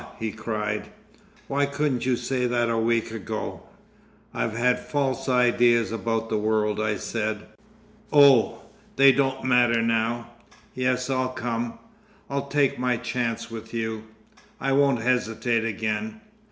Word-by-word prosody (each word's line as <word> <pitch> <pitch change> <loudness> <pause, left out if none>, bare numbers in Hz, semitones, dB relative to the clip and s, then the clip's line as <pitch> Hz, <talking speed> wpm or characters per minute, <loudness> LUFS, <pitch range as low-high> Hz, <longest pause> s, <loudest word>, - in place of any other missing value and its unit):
he 110 -2 -3
cried. 105 -1 -3 0.6
"Why 140 +1 +1
couldn't 140 -3 -1
you 130 - +3
say 125 0 -1
that 120 -1 +1
a 115 - 0
week 115 0 +1
ago?" 110 -4 -5 0.7
"I've 115 0 -2
had 125 +1 +2
false 135 -2 -2
ideas 120 -2 +3
about 115 0 -2
the 110 -1 -1
world," 105 0 0
I 110 -1 0
said. 110 +1 -3 0.7
"Oh! 140 -5 +5 0.3
they 135 0 +7
don't 135 0 0
matter 120 -2 +3
now! 115 +1 0 0.4
Yes, 125 0 0
I'll 130 -1 0
come, 120 -2 -3 0.5
I'll 140 0 -2
take 140 -2 +1
my 125 -1 +1
chance 115 -1 -3
with 115 0 -8
you, 110 -1 -3 0.5
I 135 - -1
won't 135 -4 +3
hesitate 120 -1 0
again." 115 - -3
120 Hz, 135 wpm, -25 LUFS, 115-130 Hz, 0.7 s, they